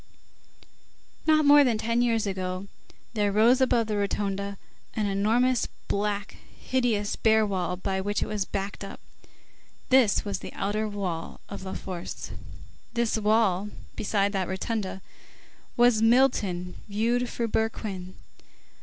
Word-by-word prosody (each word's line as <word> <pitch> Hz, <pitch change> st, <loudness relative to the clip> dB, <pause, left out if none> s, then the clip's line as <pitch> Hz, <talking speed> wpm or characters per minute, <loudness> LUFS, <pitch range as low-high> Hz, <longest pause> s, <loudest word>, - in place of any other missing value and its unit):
Not 310 Hz, -1 st, +5 dB
more 290 Hz, 0 st, +8 dB
than 240 Hz, -5 st, +2 dB
ten 230 Hz, +2 st, +1 dB
years 230 Hz, -3 st, +2 dB
ago, 185 Hz, -1 st, -3 dB, 0.5 s
there 205 Hz, -2 st, +1 dB
rose 230 Hz, +6 st, +5 dB
above 240 Hz, -3 st, +3 dB
that 215 Hz, -1 st, -2 dB
rotunda 200 Hz, -1 st, -2 dB, 0.4 s
an 215 Hz, -, 0 dB
enormous 225 Hz, +5 st, +2 dB, 0.2 s
black, 205 Hz, 0 st, -2 dB, 0.2 s
hideous, 235 Hz, -6 st, 0 dB
bare 220 Hz, -1 st, +4 dB
wall 180 Hz, -3 st, -2 dB
by 190 Hz, +1 st, -2 dB
which 205 Hz, +2 st, -1 dB
it -, -, -1 dB
was 210 Hz, -2 st, -1 dB
backed 195 Hz, +1 st, -4 dB
up. 195 Hz, -, -8 dB, 0.9 s
This 255 Hz, -7 st, +4 dB
was 200 Hz, -2 st, -2 dB
the -, -, -8 dB
outer 210 Hz, +2 st, -1 dB
wall 185 Hz, -5 st, -4 dB
of 200 Hz, -, -6 dB
La 190 Hz, -, -5 dB
Force. 180 Hz, -2 st, -6 dB, 0.6 s
This 235 Hz, -1 st, +1 dB
wall, 210 Hz, -3 st, +2 dB, 0.3 s
beside 200 Hz, -1 st, +1 dB
that 190 Hz, -2 st, 0 dB
rotunda, 190 Hz, 0 st, -3 dB, 0.7 s
was 240 Hz, -2 st, +5 dB
Milton 220 Hz, -7 st, +2 dB
viewed 235 Hz, +4 st, +1 dB
through 235 Hz, -1 st, -2 dB
Berquin. 200 Hz, -5 st, -2 dB
205 Hz, 130 wpm, -27 LUFS, 195-230 Hz, 0.9 s, more